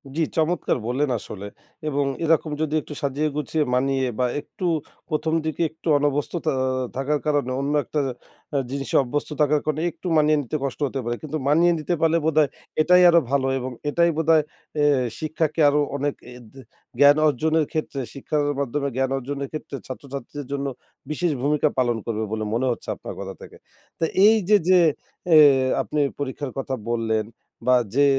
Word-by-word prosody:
জি, 165 - 0 0.2
চমৎকার 160 +3 +1
বললেন! 135 +3 0
আসলে 100 0 -8 0.4
এবং 145 -1 0 0.2
এরকম 160 -1 +2
যদি 155 -1 -1
একটু 150 - -9
সাজিয়ে 145 +2 0
গুছিয়ে 150 +1 0
মানিয়ে 135 0 +1
বা 125 - +3 0.2
একটু 180 - -7 0.4
১ম, 155 +1 -1
দিকে 155 +1 -2
একটু 160 +2 -12
অনভ্যস্তথা 145 +2 -1 0.4
থাকার 145 +3 0
কারণে 145 -4 +1
অন্য 140 +2 -1
একটা 150 - -2 0.6
আ - - +3
জিনিসে 140 -1 -3
অভ্যস্থ 145 +5 -3
থাকার 150 0 +3
কারণে 155 0 -1
একটু 180 - -9
মানিয়ে 150 0 +4
নিতে 145 +3 -3
কষ্ট 140 +1 -3
হতে 135 - -4
পারে। 120 0 -1
কিন্তু 155 0 -4
মানিয়ে 170 +4 +4
নিতে 175 +3 -1
পারলে 165 +1 +3
বোধহয় 155 -2 +3 0.3
এটাই 180 +3 +6
আরো 170 - +6
ভালো 135 -1 +2
এবং 130 +1 -4 0.2
এটাই 170 +3 +3
বোধহয় 160 -1 +4 0.3
অ্যা 145 -1 +3 0.3
শিক্ষাকে 155 0 -1
আরো 150 +1 +2 0.2
অনেক 145 0 -1
অ্যা 125 0 -11
দে 135 - -12 0.4
জ্ঞান 145 +1 +7
অর্জনের 155 +2 +1
ক্ষেত্রে 155 -3 -3
শিক্ষার 145 +2 -1 0.2
মাধ্যমে 140 +1 -1
জ্ঞান 130 0 0
অর্জনের 140 +1 -4
ক্ষেত্রে 155 -2 -6
ছাত্রছাত্রীদের 140 +1 -7
জন্য 140 0 -2 0.5
বিশেষ 170 +2 0
ভূমিকা 150 +2 +2
পালন 120 -2 +2
করবে 110 -2 -2
বলে 110 0 -2
মনে 120 +3 +1
হচ্ছে - - -6
আপনার - - -8
কথা - - -5
থেকে। - - -12 0.4
তো - - -1 0.2
এই 220 +1 +7
যে, 210 - +7
যে, 185 -1 +7 0.5
অ্যা 165 - +5 0.5
আপনি 150 - -3 0.2
পরীক্ষার 140 -1 -4
কথা 135 0 -2 0.2
বললেন 110 -2 0 0.4
বা 125 - +6 0.2
যে, 145 - +5
145 Hz, 170 wpm, -23 LUFS, 135-155 Hz, 0.6 s, জ্ঞান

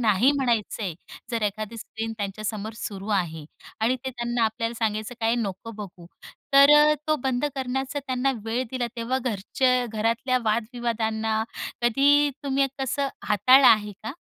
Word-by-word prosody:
नाही 220 +3 +4
म्हणायच 240 -6 0
आहे 190 -6 -3 0.4
जर 230 -2 -2
एखादी 215 +2 -3
स्क्रीन 225 +1 -5
त्यांच्यासमोर 215 +1 -4
सुरू 200 -1 -6
आहे 160 -4 -4 0.4
आणि 235 +4 +2
ते 265 - -2
त्यांना 240 -1 -1
आपल्याला 230 +1 -2
सांगायचं, 215 +1 -2
काय 225 +1 +2
नको 205 0 -4
बघू 195 -5 -10 0.5
तर 280 +1 +8
अ, 300 0 +6
तो 310 - +3
बंद 260 0 0
करण्याचा 265 +1 -3
त्यांना 260 +1 0
वेळ 230 +3 -1
दिला 255 -2 -2
तेव्हा 235 +3 -1
घरच्या 250 +3 +1
घरातल्या 230 +4 +1
वाद 215 +1 +1
विवादांना, 220 -2 -1 0.4
कधी 285 +5 +4
तुम्ही 275 0 +2
कसं 275 +1 -1 0.2
हाताळलं 255 +7 +6
आहे 210 -1 +5
का? 220 +4 -5
230 Hz, 150 wpm, -25 LUFS, 215-260 Hz, 0.5 s, तर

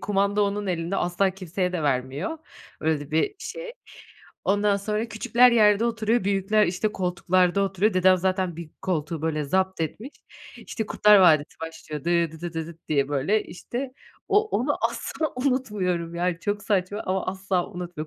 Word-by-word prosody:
kumanda 200 +1 +1
onun 205 0 -1
elinde 175 +1 -2
asla 180 +2 +1
kimseye 185 0 -3
de 170 -4 -2
vermiyor. 135 - -1 0.4
Öyle 160 -1 +1
de 145 0 -9
bir 160 - +1
şey. 485 -1 -7 0.7
Ondan 205 0 +2
sonra 210 +3 -2
küçükler 235 +3 +4
yerde 210 -1 +5
oturuyor 230 -1 0
büyükler 200 +1 +2
işte 200 +4 -1
koltuklarda 180 +1 +1
oturuyor. 195 +2 +1
Dedem 185 0 +5
zaten 185 -2 -1
bir 165 -2 -8
koltuğu 160 -3 -2
böyle 155 -2 -1
zaptetmiş. 190 - -1 0.5
işte 220 -2 -5
Kurtlar 210 0 +5
Vadisi 155 -5 +4
başlıyor 160 -2 -7
dı 170 -2 +2
dıdı 170 +1 -6
dı 160 -1 -3
dıt 165 -1 -14
diye 140 -2 +1
böyle, 145 +10 +1
işte, 250 +8 -6 0.4
o 430 +1 +3
onu 285 +5 0
asla 315 -3 -3
unutmuyorum 210 -11 -1
yani 175 0 -1
çok 205 -1 -2
saçma 205 0 -1
ama 185 0 -1
asla 190 -1 -1
unutmuyorum. 175 -4 -6
185 Hz, 155 wpm, -25 LUFS, 170-210 Hz, 0.7 s, yerde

